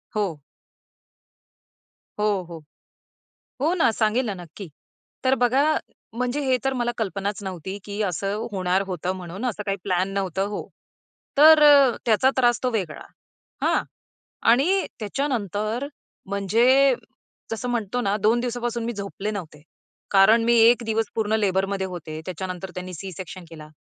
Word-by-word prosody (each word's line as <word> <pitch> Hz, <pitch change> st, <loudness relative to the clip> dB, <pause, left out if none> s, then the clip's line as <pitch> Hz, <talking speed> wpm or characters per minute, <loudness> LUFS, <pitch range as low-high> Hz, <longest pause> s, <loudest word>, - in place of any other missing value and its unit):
हो. 195 Hz, -8 st, -1 dB, 1.8 s
हो, 210 Hz, -, +1 dB, 0.2 s
हो, 165 Hz, -2 st, -9 dB, 1.0 s
हो 320 Hz, +4 st, +2 dB
ना, 335 Hz, -, +3 dB
सांगेल 220 Hz, +3 st, +1 dB
ना 210 Hz, -, -2 dB
नक्की. 175 Hz, +4 st, -10 dB, 0.6 s
तर 260 Hz, 0 st, +3 dB
बघा, 250 Hz, +2 st, +3 dB, 0.5 s
म्हणजे 250 Hz, +4 st, -1 dB
हे 260 Hz, -1 st, +3 dB
तर 270 Hz, -, +1 dB
मला 240 Hz, -2 st, -1 dB
कल्पनाच 200 Hz, -1 st, -3 dB
नव्हती 190 Hz, +1 st, -5 dB
की 205 Hz, +1 st, -5 dB
असं 200 Hz, +5 st, -2 dB
होणार 185 Hz, -1 st, +1 dB
होतं 180 Hz, -1 st, -2 dB
म्हणून 185 Hz, +5 st, -6 dB
असं 215 Hz, -4 st, -2 dB
काही 195 Hz, -1 st, -1 dB
प्लॅन 185 Hz, 0 st, 0 dB
नव्हतं 195 Hz, -1 st, -1 dB
हो. 205 Hz, -, -5 dB, 0.7 s
तर 310 Hz, +1 st, +8 dB
अ, 280 Hz, -4 st, +7 dB
त्याचा 235 Hz, +3 st, +4 dB
त्रास 240 Hz, -2 st, +3 dB
तो 255 Hz, -, +2 dB
वेगळा, 185 Hz, -9 st, -3 dB, 0.6 s
हां? -, -, +2 dB, 0.7 s
आणि 335 Hz, +11 st, +3 dB
त्याच्यानंतर 220 Hz, -, -2 dB, 0.4 s
म्हणजे 235 Hz, +8 st, +3 dB, 0.6 s
जसं 225 Hz, +2 st, -3 dB
म्हणतो 240 Hz, -1 st, -1 dB
ना 205 Hz, -3 st, 0 dB
2 215 Hz, +3 st, +2 dB
दिवसापासून 240 Hz, -1 st, -3 dB
मी 235 Hz, -, -2 dB
झोपले 200 Hz, 0 st, -5 dB
नव्हते. 165 Hz, -8 st, -7 dB, 0.5 s
कारण 210 Hz, +4 st, +6 dB
मी 235 Hz, +1 st, +4 dB
1 235 Hz, +2 st, +6 dB
दिवस 225 Hz, 0 st, 0 dB
पूर्ण 215 Hz, -1 st, -1 dB
लेबरमध्ये 195 Hz, -1 st, 0 dB
होते, 160 Hz, -4 st, -7 dB
त्याच्या 185 Hz, 0 st, -4 dB
नंतर 185 Hz, 0 st, -6 dB
त्यांनी 180 Hz, 0 st, -6 dB
सी-सेक्शन 185 Hz, +1 st, -8 dB
केला. 155 Hz, -2 st, -11 dB
210 Hz, 140 wpm, -24 LUFS, 190-240 Hz, 1.8 s, तर